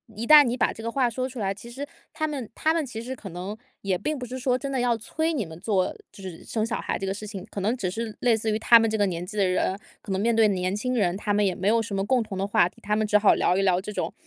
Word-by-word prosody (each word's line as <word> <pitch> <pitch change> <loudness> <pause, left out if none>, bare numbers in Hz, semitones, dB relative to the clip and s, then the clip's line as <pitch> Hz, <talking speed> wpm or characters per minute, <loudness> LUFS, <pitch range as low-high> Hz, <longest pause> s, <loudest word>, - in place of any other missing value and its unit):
一 225 +3 -4
旦 300 +2 +9
你 245 -1 -1
把 - - +1
这 225 - -10
个 230 - -2
话 250 -1 +2
说 255 +3 -2
出 255 -1 -8
来， 195 -2 0
其 235 +4 -12
实 280 +3 -6 0.3
他 310 - -1
们 275 -7 -5
他 315 +1 +2
们 325 -3 0
其 225 -3 -6
实 255 +3 -5
可 215 -5 -9
能 185 +5 -6 0.2
也 190 -2 0
并 305 +10 -2
不 250 - -5
是 255 +2 -6
说 250 0 +1
真 275 +2 -5
的 265 - 0
要 245 -2 +2
催 315 +9 -2
你 235 - -1
们 160 +1 -11
做 190 -3 0 0.2
就 195 - -14
是 180 -3 -8
生 220 -1 -2
小 230 +1 -2
孩 - - -2
这 195 - -4
个 195 - 0
事 205 +2 -7
情， 200 -2 -7
可 200 - -5
能 220 +5 +1
只 185 -7 -2
是 220 +2 -4
类 240 -2 +3
似 220 0 -1
于 215 - 0
他 235 +1 +7
们 225 0 +2
这 220 - -1
个 205 - +3
年 175 -2 -3
纪 210 +3 -8
的 195 - +3
人， 185 +1 0 0.2
可 200 - -7
能 190 - 0
面 230 +3 +2
对 220 -1 +5
年 185 0 -1
轻 250 +5 -2
人， 180 -6 +1
他 205 +1 -1
们 205 0 +3
也 185 - 0
没 190 - -2
有 230 +1 +3
什 215 -2 -6
么 195 - 0
共 255 +1 +2
同 195 -3 -7
的 195 - 0
话 190 - +4
题， - - -22
他 210 +1 0
们 215 - +1
只 210 - +5
好 205 -1 +5
聊 180 - +2
一 - - +2
聊 185 -2 +3
这 210 - -6
种， - - -3
215 Hz, 355 characters per minute, -25 LUFS, 195-245 Hz, 0.3 s, 旦